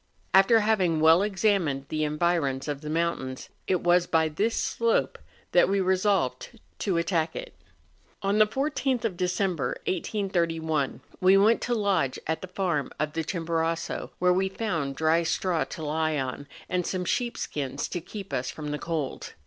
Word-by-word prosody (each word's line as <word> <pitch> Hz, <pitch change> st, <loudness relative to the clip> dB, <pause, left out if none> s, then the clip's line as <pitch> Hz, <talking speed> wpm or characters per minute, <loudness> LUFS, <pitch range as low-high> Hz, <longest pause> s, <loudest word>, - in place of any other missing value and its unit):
After 195 Hz, +4 st, +6 dB
having 190 Hz, -7 st, +2 dB
well 160 Hz, +3 st, +6 dB
examined 195 Hz, -9 st, +1 dB
the 155 Hz, 0 st, -1 dB
environs 150 Hz, -3 st, 0 dB
of 145 Hz, -1 st, -3 dB
the 150 Hz, -, -6 dB
moun¬ 170 Hz, +2 st, 0 dB
tains, 130 Hz, 0 st, -7 dB, 0.2 s
it 185 Hz, -2 st, +1 dB
was 175 Hz, 0 st, +3 dB
by 160 Hz, -1 st, +2 dB
this 210 Hz, +9 st, 0 dB
slope 230 Hz, -1 st, 0 dB, 0.3 s
that -, -, +5 dB
we 200 Hz, 0 st, +2 dB
resolved 190 Hz, -, 0 dB, 0.2 s
to 190 Hz, -5 st, 0 dB
attack 170 Hz, -1 st, 0 dB
it. -, -, -6 dB, 0.7 s
On 200 Hz, +2 st, +2 dB
the 215 Hz, -, +6 dB
14th 265 Hz, -1 st, -1 dB
of 205 Hz, -5 st, -1 dB
December, 180 Hz, -2 st, -1 dB
1831, 165 Hz, -7 st, -1 dB, 0.2 s
we 190 Hz, +1 st, +6 dB
went 215 Hz, +4 st, +4 dB
to 245 Hz, -, 0 dB
lodge 200 Hz, -, +1 dB
at 160 Hz, 0 st, -2 dB
the 185 Hz, -, -6 dB
farm 175 Hz, -6 st, -1 dB
of 150 Hz, 0 st, -1 dB
the 165 Hz, -, -1 dB
Chimborazo, 165 Hz, -1 st, -2 dB
where 180 Hz, 0 st, +3 dB
we 190 Hz, +1 st, +1 dB
found 165 Hz, -10 st, -2 dB
dry 160 Hz, +2 st, +3 dB
straw 170 Hz, 0 st, 0 dB
to 160 Hz, -, -7 dB
lie 155 Hz, +1 st, 0 dB
on, 135 Hz, +1 st, -4 dB, 0.2 s
and 180 Hz, -1 st, -1 dB
some 185 Hz, -1 st, -2 dB
sheep 240 Hz, +6 st, -1 dB
skins 140 Hz, -1 st, -3 dB
to 175 Hz, -, -3 dB
keep 195 Hz, 0 st, -8 dB
us 125 Hz, -1 st, -1 dB
from 150 Hz, -1 st, -5 dB
the 150 Hz, -, -3 dB
cold. 160 Hz, -5 st, -4 dB
170 Hz, 170 wpm, -27 LUFS, 155-195 Hz, 0.7 s, After